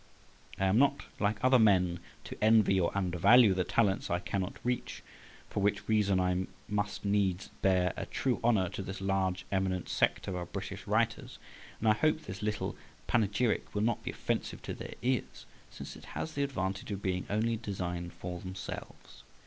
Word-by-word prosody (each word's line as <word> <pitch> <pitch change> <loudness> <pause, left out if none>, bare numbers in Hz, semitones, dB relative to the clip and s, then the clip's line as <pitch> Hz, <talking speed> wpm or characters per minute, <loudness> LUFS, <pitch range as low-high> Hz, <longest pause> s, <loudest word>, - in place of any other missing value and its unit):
I 95 - +2
am 95 +4 +4
not, 140 0 +3 0.2
like 105 +1 0
other 130 0 +6
men, 90 -5 +4 0.2
to - - -7
envy 110 -3 +5
or 85 - +2
undervalue 100 +4 +5
the 90 -1 +1
talents 100 0 +1
I 85 - +2
cannot 95 +1 -3
reach, 125 0 -2 0.4
for - - -3
which 100 0 0
reason 105 -3 +3
I 90 0 +1 0.2
must 105 0 -2
needs 100 -2 +1
bear 90 -2 +3
a - - -5
true 130 -2 -1
honour 110 -6 +3
to - - -5
this 95 0 -6
large 95 -2 0
eminent 95 -2 -1
sect - - +1
of 95 - -2
our 90 -1 -4
British 85 - -6
writers. - - 0 0.4
And 110 - -1
I 110 - +7
hope 155 +7 +1
this 95 -10 -8
little 105 -1 -2 0.3
panegyric 110 +1 +1
will 105 - +1
not 115 -1 +1
be - - -3
offensive - - -3
to - - -4
their - - -8
ears, 125 -2 -1 0.2
since - - -9
it - - -12
has 160 - -3
the 140 - -1
advantage 100 -9 -2
of 100 -1 -4
being 90 -1 -1
only 115 +3 +1
designed 90 -5 -4
for 90 -1 -6
themselves. 95 +3 -8
100 Hz, 180 wpm, -31 LUFS, 95-110 Hz, 0.4 s, I